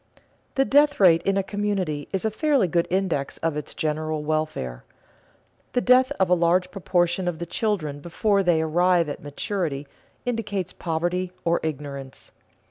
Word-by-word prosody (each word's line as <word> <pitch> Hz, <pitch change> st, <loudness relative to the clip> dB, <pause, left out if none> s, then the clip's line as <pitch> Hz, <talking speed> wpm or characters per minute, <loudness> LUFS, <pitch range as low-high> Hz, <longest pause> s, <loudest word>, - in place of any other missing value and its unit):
_ -, -, -22 dB, 0.4 s
The 270 Hz, -, +3 dB
death 290 Hz, +2 st, +4 dB
rate 170 Hz, -4 st, +6 dB
in 195 Hz, 0 st, +2 dB
a 195 Hz, -, +1 dB
community 195 Hz, -7 st, -2 dB
is 195 Hz, +2 st, -2 dB
a 220 Hz, -, +1 dB
fairly 275 Hz, -, +2 dB
good 170 Hz, 0 st, +1 dB
index 180 Hz, -7 st, -1 dB
of 165 Hz, -2 st, -1 dB
its 150 Hz, -, -6 dB
general 155 Hz, 0 st, -2 dB
welfare. 155 Hz, -, -2 dB, 0.9 s
The 245 Hz, -, +2 dB
death 255 Hz, +2 st, +5 dB
of 190 Hz, -, +4 dB
a 180 Hz, -, +3 dB
large 180 Hz, +1 st, +2 dB
proportion 180 Hz, -1 st, 0 dB
of 175 Hz, -2 st, -1 dB
the 170 Hz, -, -4 dB
children 170 Hz, -7 st, -2 dB
before 195 Hz, +6 st, +1 dB
they 170 Hz, -4 st, +2 dB
arrive 175 Hz, +1 st, +2 dB
at 145 Hz, -, -6 dB
maturity 145 Hz, -1 st, -3 dB, 0.4 s
indicates 210 Hz, -6 st, -2 dB
poverty 175 Hz, +2 st, -2 dB
or 170 Hz, 0 st, +2 dB
ignorance. 140 Hz, -3 st, -6 dB
175 Hz, 160 wpm, -24 LUFS, 155-195 Hz, 0.9 s, rate